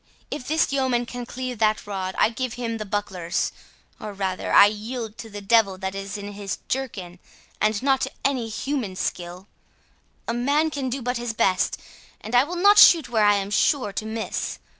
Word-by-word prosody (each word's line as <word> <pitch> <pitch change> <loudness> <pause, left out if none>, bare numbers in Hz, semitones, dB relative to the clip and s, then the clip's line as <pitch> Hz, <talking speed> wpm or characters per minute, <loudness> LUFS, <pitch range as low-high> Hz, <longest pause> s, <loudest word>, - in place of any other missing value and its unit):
If 275 -4 -5
this 315 -2 +1
yeoman 260 -3 +1
can 245 0 -7
cleave 255 -2 -5
that 215 -1 +1
rod, 190 -2 -4
I - - +4
give 250 0 -4
him 230 -2 -3
the 215 - -5
bucklers—or 200 +1 -4
rather, 190 -2 -3
I - - +9
yield 220 +2 -4
to 225 - -8
the 205 -1 -8
devil 200 -2 +3
that 190 0 -4
is 195 +1 -5
in 205 0 -7
his 200 -1 -5
jerkin, 195 -10 -4 0.4
and 215 +1 +1
not 270 -1 +2
to - - -1
any 255 -5 0
human 230 -3 -3
skill; 180 0 -4 0.8
a 230 - -1
man 285 +6 +1
can 275 -3 -3
but 250 -1 -2
do - - -5
his 240 -1 -3
best, 190 -3 +1 0.4
and 220 - -9
I 245 +1 +6
will 350 +4 -6
not 405 +4 +6
shoot 320 -8 +7
where 220 -3 +2
I 205 0 +5
am 200 0 -2
sure 210 0 +2
to 215 - -4
miss. 220 0 -3
225 Hz, 190 wpm, -24 LUFS, 200-255 Hz, 0.8 s, I